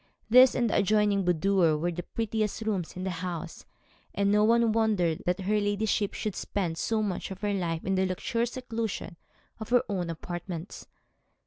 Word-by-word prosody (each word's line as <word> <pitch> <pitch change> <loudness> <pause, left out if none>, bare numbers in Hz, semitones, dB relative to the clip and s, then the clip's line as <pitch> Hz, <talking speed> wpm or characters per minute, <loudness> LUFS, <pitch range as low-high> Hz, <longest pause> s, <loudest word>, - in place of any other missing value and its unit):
This 255 +2 +8
and 240 - +2
the - - +1
adjoining 205 -1 +2
boudoir 175 -2 +3
were 175 +3 -1
the 175 +1 -4
prettiest 220 +1 -2
rooms 195 -6 -2
in 185 - -5
the 190 - -2
house, 175 -1 -6 0.5
and 200 +1 +2
no 210 0 +4
one 230 +1 +4
wondered 210 -8 +1
that 180 +2 0
her 210 +3 +1
ladyship 205 0 0
should 210 -4 -3
spend 175 -5 -3
so 220 -1 0
much 195 -4 -3
of 190 -1 -8
her 205 -1 0
life 170 -4 -2
in 195 - 0
the 190 0 +2
luxurious 230 +6 -2
seclusion 230 -7 -4 0.4
of 220 - -7
her 245 0 +4
own 180 -4 -2
apartments. 175 +1 -6
200 Hz, 180 wpm, -28 LUFS, 180-220 Hz, 0.5 s, This